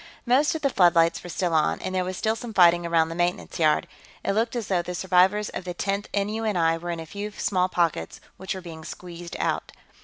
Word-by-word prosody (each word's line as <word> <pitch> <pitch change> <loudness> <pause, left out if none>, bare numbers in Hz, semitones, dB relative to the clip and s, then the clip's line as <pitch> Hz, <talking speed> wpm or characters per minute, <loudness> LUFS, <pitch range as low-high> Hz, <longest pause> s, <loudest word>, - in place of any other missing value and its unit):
Most 270 +6 +3
of 315 - -5
the 275 - +2
floodlights 170 -4 +4
were 175 - -9
still 175 -1 -1
on, 155 -1 +2
and 185 - -4
there 185 -1 +1
was 185 0 -4
still 220 0 0
some 225 -1 -8
fighting 175 -1 +5
around 165 -1 +2
the - - -4
maintenance 175 +1 -2
yard. 155 -2 +3 0.4
It - - +2
looked 225 +4 0
as 235 -3 -2
though 185 -3 +1
the 180 +1 -6
survivors 190 +3 +3
of - - -6
the 180 -1 -5
Tenth 200 +2 -2
N.U.N.I. 200 -5 0
were 175 +1 -6
in 170 -1 -3
a 165 - -6
few 205 +5 -5
small 185 -3 0
pockets 165 - -1 0.2
which 190 +1 -4
were 190 - -6
being 165 -3 -9
squeezed 175 0 -8
out. - - -2
180 Hz, 225 wpm, -25 LUFS, 170-205 Hz, 0.4 s, fighting